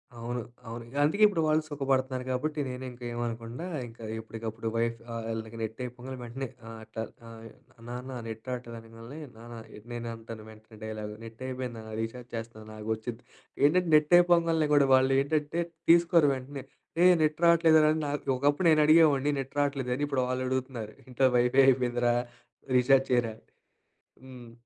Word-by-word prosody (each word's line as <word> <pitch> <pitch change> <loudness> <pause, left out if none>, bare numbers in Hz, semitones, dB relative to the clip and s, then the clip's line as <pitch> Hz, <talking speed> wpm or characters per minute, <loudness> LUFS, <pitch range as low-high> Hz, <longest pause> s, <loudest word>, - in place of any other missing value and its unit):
అవును, 120 +1 -4 0.3
అవును. 115 +1 -6 0.2
అందుకే 200 +9 +2
ఇప్పుడు 195 -6 -1
వాళ్ళు 155 0 +3
సుఖపడుతున్నారు. 135 -3 -1
కాబట్టి 150 +4 -2
నేను 125 0 -6
ఇంకా 125 0 -13
ఏమనకుండా, 120 +4 -4 0.2
ఇంకా 115 0 -13 0.2
ఎప్పటికప్పుడు 110 0 -6
వైఫ్ 115 0 0
వాళ్ళకి 115 -1 -5
నెట్ 110 +2 -4
అయిపోంగనే 125 +1 -7
వెంటనే 130 +3 -5 0.2
ఆహ్, 115 0 -8
అట్లా 110 0 -6 0.3
ఆహ్, 115 -1 -11 0.5
నాన్న 125 +1 -6
నెట్ 110 +2 -8
రావట్లేదు 120 -2 -5
అనంగాలనే, 115 +5 -11 0.2
నాన్న 120 +1 -10 0.4
నేను 120 0 -5
అంటాను 115 -1 -10
వెంటనే 110 0 -16
డైలాగ్, 110 -1 -5
నెట్ 115 +1 -11
అయిపోయింది 130 -2 -5
నాన్న, 110 0 -10
రీచార్జ్ 120 +2 -6
చేస్తున్నా 110 -1 -8
ఆగు 105 +1 -6
వచ్చిద్ది. 115 +2 -7 0.4
ఏంటంటే 175 +4 +4
నెట్ 150 +2 +3
అయిపోంగాల్నే 165 -3 +3
కూడా 140 -1 +5
వాళ్ళు 130 +1 +3
ఏంటంటే 150 +3 -1 0.3
తీసుకోరు 170 -3 +5
వెంటనే. 135 +1 -7 0.4
ఏహ్! 180 0 +7
నెట్ 155 +2 0
రావట్లేదురా 160 -2 +6
నా 145 - -2 0.3
ఒకప్పుడు 145 +6 +2
నేను 155 -1 +5
అడిగేవాడిని 150 -3 +5
నెట్ 135 - -10
రావట్లేదని, 140 -1 0
ఇప్పుడు 135 -3 0
వాళ్ళు 130 0 -1
అడుగుతున్నారు. 130 -4 -3
ఇంట్లో 130 +1 +2
వైఫై 125 +3 +4
అయిపోయిందిరా, 120 -2 +2 0.6
రీచార్జ్ 135 +1 +4
చేయరా 120 -3 +2
అని. - - -26 0.8
హ్మ్. 125 -3 -11
125 Hz, 155 wpm, -29 LUFS, 115-145 Hz, 0.8 s, ఏహ్